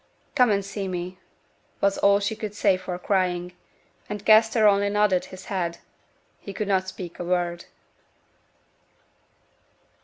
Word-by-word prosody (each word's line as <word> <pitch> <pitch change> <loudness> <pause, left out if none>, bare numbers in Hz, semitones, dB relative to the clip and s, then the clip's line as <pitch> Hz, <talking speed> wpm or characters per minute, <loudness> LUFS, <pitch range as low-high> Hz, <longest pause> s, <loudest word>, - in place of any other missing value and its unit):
'Come 250 -4 +4
and 200 -2 +1
see 195 0 -4
me,' 180 0 -5 0.6
was 200 0 +1
all 200 0 +5
she 205 +2 -2
could 210 -1 -6
say 200 -3 +3
for 185 -1 -5
crying: 180 -2 -1 0.6
and 210 0 -6
Kester 220 0 +5
only 200 0 +3
nodded 205 -3 +2
his 185 0 -11
head 175 -3 -2 0.6
he 200 - -8
could 210 +1 -3
not 190 -2 +1
speak 185 -2 -8
a - - -3
word. 175 -1 -1
195 Hz, 135 wpm, -25 LUFS, 180-205 Hz, 0.6 s, all